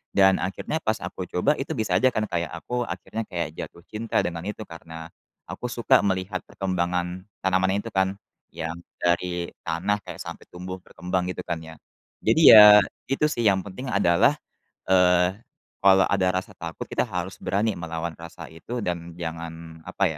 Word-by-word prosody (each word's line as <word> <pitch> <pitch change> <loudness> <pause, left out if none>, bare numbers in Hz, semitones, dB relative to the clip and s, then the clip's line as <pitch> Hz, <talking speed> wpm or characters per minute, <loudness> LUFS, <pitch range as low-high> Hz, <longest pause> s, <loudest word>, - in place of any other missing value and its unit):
Dan 95 -1 +5
akhirnya 95 - -3
pas 110 0 +1
aku 90 0 -5
coba, 140 +12 +1
itu 135 - -4
bisa 110 -3 0
aja 130 - +4
kan 110 -1 0
kayak 85 -2 -1
aku 120 +9 -3
akhirnya 95 +6 -5
kayak 85 -4 -3
jatuh 85 - -8
cinta 110 +1 -1
dengan 85 -1 -4
itu 105 +1 -5
karena, 80 -1 -9 0.4
aku 125 - -6
suka 120 -3 +3
melihat 95 -1 -1
perkembangan 90 -1 -2 0.2
tanaman 95 +1 +2
itu 110 +3 -4
kan, 95 0 +1 0.3
yang 80 0 -5 0.2
dari 85 0 0
tanah 90 +5 -1
kayak 90 -2 -9
sampai 85 - -8
tumbuh 90 +1 -7
berkembang 90 0 -3
gitu 90 0 -5
kan 85 -1 -2
ya. 80 0 -11 0.5
Jadi 160 - +4
ya, 105 -1 +11 0.2
itu 135 +3 +1
sih 120 -5 -2
yang 95 -2 +4
penting 120 +7 -7
adalah, 95 +6 +4 0.5
eee, 90 -1 +4 0.5
kalau 95 -1 +6
ada 95 -2 +1
rasa 95 +1 -2
takut, 85 -3 -7
kita - - -1
harus 90 +1 -4
berani 105 +3 0
melawan 85 -1 -4
rasa 85 0 -9
itu 115 +8 -5
dan 85 -1 -4
jangan 80 -1 -7
apa - - -2
90 Hz, 165 wpm, -25 LUFS, 85-100 Hz, 0.5 s, ya